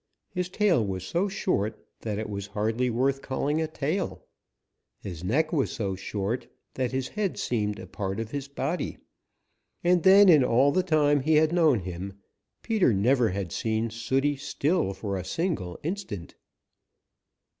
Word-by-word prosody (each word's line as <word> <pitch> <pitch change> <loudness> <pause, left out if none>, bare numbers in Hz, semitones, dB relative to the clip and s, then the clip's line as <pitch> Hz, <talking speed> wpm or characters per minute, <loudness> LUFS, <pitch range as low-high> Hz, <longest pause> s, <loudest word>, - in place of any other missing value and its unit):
His 180 -2 -2
tail 185 - +2
was 95 -3 -3
so 170 - 0
short 180 - -1
that 105 -2 -3
it 110 - -3
was 100 -1 -5
hardly 115 +4 +1
worth 135 +3 +1
calling 145 +4 -1
a 160 - 0
tail. 155 +5 -3 0.7
His 90 -4 -7
neck 155 - +1
was 140 -5 +1
so 100 -4 -2
short 100 +5 -3 0.3
that 130 -2 -1
his 130 -1 -2
head 205 -3 -2
seemed 105 -4 -1
a - - -8
part 95 +2 -4
of 115 0 -4
his 140 -1 -4
body. 140 +5 -3 0.9
And 175 0 +4
then 195 +3 +7
in 155 -7 +7
all 130 +3 +4
the 185 - +2
time 150 -4 +3
he 155 +4 +2
had 155 +1 +4
known 155 - +4
him, 90 +2 -6 0.5
Peter 215 - +3
never 120 +4 +3
had 95 -2 -3
seen 110 0 -1
Sooty 135 +5 0
still 140 - 0
for 100 0 -3
a 90 - -4
single 105 - -2
instant. 155 - -5
130 Hz, 160 wpm, -27 LUFS, 105-160 Hz, 0.9 s, then